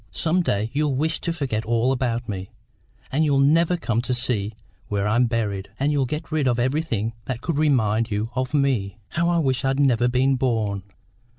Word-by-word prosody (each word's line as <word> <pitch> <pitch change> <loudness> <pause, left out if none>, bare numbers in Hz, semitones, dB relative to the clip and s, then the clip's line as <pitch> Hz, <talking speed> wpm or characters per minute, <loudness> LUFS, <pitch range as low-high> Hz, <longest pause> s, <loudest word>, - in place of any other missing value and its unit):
Some 170 +3 +1
day 110 - -1
you'll 145 -1 +1
wish 160 +4 -1
to 170 - -1
forget 135 -9 -2
all 115 +3 +1
about 120 -2 -1
me, 95 -3 -5 0.6
and 150 +4 +2
you'll 145 -3 +2
never 165 +5 +4
come 120 -8 0
to 125 0 -1
see 110 -4 -1 0.3
where 100 0 -1
I'm 120 +4 +3
buried, 105 -4 -2
and 140 +2 +2
you'll 140 -3 +1
get 150 +4 -5
rid 155 -4 +1
of 120 -2 +2
everything 125 -4 0
that 120 0 -4
could 160 -3 -1
remind 115 -7 +2
you 105 +2 -2
of 130 +2 -1
me. 125 -8 +1
How 170 +1 0
I 175 - +2
wish 130 -6 +1
I'd 135 +1 +1
never 125 -4 +3
been 130 +2 +2
born!" 110 -6 0
125 Hz, 195 wpm, -23 LUFS, 115-145 Hz, 0.6 s, never